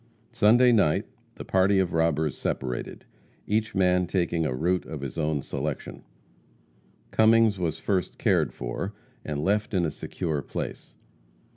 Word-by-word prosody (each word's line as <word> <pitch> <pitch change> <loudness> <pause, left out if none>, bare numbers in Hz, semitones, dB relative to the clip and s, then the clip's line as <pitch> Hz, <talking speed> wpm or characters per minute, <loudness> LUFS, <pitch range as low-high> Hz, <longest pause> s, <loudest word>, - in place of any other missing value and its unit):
Sunday 120 +2 +5
night 100 -10 +3 0.3
the - - -8
party 95 +1 +3
of 95 -2 +1
robbers 80 -3 +1
separated, 60 -2 -4 0.4
each 110 +1 -1
man 90 -1 +3
taking 85 -3 0
a 65 - -2
route 85 +3 0
of 75 -3 -6
his 70 -2 -5
own 75 -3 -1
selection. 70 +1 -5 1.1
Cummings 110 -2 +4
was 80 -3 -1
first 90 +1 -1
cared - - +2
for - - -5 0.3
and 75 -1 -3
left 105 +2 0
in 90 -2 +2
a 80 - -1
secure 80 -5 -3
place. - - -6
85 Hz, 140 wpm, -26 LUFS, 75-100 Hz, 1.1 s, Sunday